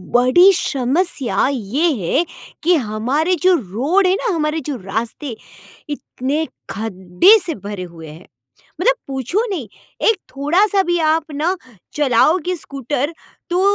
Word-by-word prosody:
बड़ी 305 +11 +6
समस्या 280 -3 0
ये 270 - 0
है 280 - +1 0.4
कि 355 +2 +4
हमारे 270 +12 0
जो 370 - +6
रोड 275 - +1
है 370 - +3
ना 470 -5 0
हमारे 305 0 0
जो 280 - -2
रास्ते, 225 +6 -4 0.5
इतने 290 +1 -3 0.2
खड्डे 200 - +3
से 330 - -3
भरे 200 -3 -5
हुए 165 -2 -10
हैं। 155 +4 -12 0.6
मतलब - - +4
पूछो 275 - -1
नहीं 305 - -4 0.4
एक 445 - +3 0.2
थोड़ा-सा 380 +8 +2
भी 345 -1 0
आप 320 0 +1
ना 320 +6 0 0.4
चलाओगे 300 +6 +2
स्कूटर 285 0 -3 0.4
तो 355 +1 +1
290 Hz, 130 wpm, -19 LUFS, 235-350 Hz, 0.6 s, बड़ी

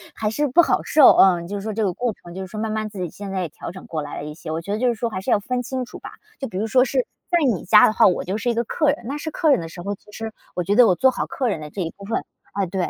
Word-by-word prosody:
还 215 - -1
是 290 +7 0
不 305 +8 +6
好 - - +1
受， 300 -3 +7
嗯。 180 -3 +5
就 205 - -5
是 - - -5
说 215 +2 -4
这 220 +1 -1
个 190 -3 0
过 240 +3 -2
程， 175 -3 -13
就 190 - -6
是 190 - -6
说 215 +3 -7
慢 220 0 -2
慢 215 0 -2
自 205 -2 -9
己 180 -2 -3
现 200 +2 -8
在 190 -1 -2
也 175 - -3
调 - - -8
整 185 +1 -11
过 160 -2 -4
来 145 0 -7
了 - - -5
一 150 - -6
些， 155 +1 -10
我 160 - -2
觉 175 - -6
得 210 - -2
就 250 - +2
是 240 - +1
说 230 +2 -2
还 185 - -4
是 195 - -5
要 225 - +4
分 250 +4 -2
清 255 +1 -3
楚 - - -11
吧。 - - -9 0.3
就 270 - -3
比 185 - -7
如 215 +3 -1
说 250 +3 +4
是， 260 -1 0 0.2
在 350 - +3 0.2
你 185 - -5
家 210 +3 +7
的 - - +3
话， - - +5
我 180 - +1
就 190 +3 -3
是 230 +3 -1
一 - - +2
个 235 +1 0
客 300 +6 -1
人， 280 - -2
那 280 +3 -3
是 315 - -4
客 315 0 +2
人 270 - +4
的 165 - -5
时 175 +1 -9
候， 200 +3 -3
其 205 - -15
实， 225 +1 -6 0.2
我 180 - -1
觉 195 +4 0
得 245 0 +7
我 185 - +4
做 260 +8 +4
好 - - -3
客 255 -3 -1
人 200 - -2
的 150 - -7
这 195 - -5
一 165 -2 -3
部 200 - -10
分。 225 - -2 0.3
哎， 195 -1 -1
对， 185 0 -2
210 Hz, 390 characters per minute, -22 LUFS, 185-245 Hz, 0.3 s, 受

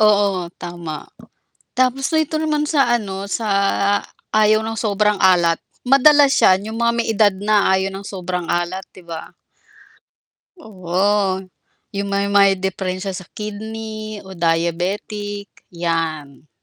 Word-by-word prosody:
Oo 200 -4 +3
tama, 170 -3 -7 0.7
tapos 255 +1 +1
dito 315 -1 +1
naman 305 -1 0
sa, 275 -6 +3
ano, 195 -3 -5
sa 220 +2 -2 0.8
ayaw 215 0 +4
ng 225 0 -4
sobrang 210 -1 +1
alat, 175 -3 +4 0.3
madalas 280 +1 +6
siya, 185 0 +5
yung 220 +2 -6
mga 235 0 +3
may 235 - 0
edad 205 -1 +4
na 205 0 +2
ayaw 190 0 0
ng 195 +1 -7
sobrang 180 -2 -4
alat, 175 +2 -2
'di 185 - -15
ba? 165 -1 -7 1.2
Oo 190 - 0 0.5
yung, 200 0 -2
may 200 0 +1
may 200 -1 +5
diperensya 190 0 -3
sa 185 - -7
kidney 215 0 -6
o 190 - -10
diabetic, 185 +5 -1 0.2
'yan. 160 -4 -3
200 Hz, 125 wpm, -20 LUFS, 180-215 Hz, 1.2 s, madalas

